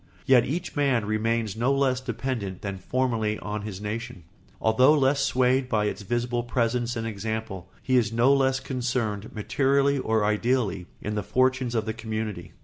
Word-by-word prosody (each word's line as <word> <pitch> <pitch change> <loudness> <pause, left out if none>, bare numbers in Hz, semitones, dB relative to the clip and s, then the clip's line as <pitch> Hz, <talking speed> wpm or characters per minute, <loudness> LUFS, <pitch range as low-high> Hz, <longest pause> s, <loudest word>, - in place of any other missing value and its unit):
Yet 125 -3 +5
each 175 +6 -3
man 135 -7 +2
remains 110 0 0
no 120 +4 +1
less 135 -2 +1
dependent 115 -6 -4
than 100 -2 -4
formerly 115 -1 0
on 105 0 -4
his 100 -3 -6
nation, 105 -3 -5 0.4
although 130 +7 +4
less 135 0 +2
swayed 130 0 +2
by 105 -3 +1
its 105 0 -3
visible 120 +3 -1
presence 120 0 -1
and 115 -1 -3
example; 110 -3 -4
he 130 -1 +2
is 115 -3 +2
no 120 +4 +4
less 135 -1 +2
concerned, 120 -6 -2
materially 140 +5 +1
and 130 - -4 0.2
ideally, 105 -3 0 0.2
in 105 - -3
the 105 - -1
fortunes 130 +2 +1
of 110 -1 0
the 110 - -2
community. 110 -5 -5
115 Hz, 165 wpm, -26 LUFS, 105-130 Hz, 0.4 s, Yet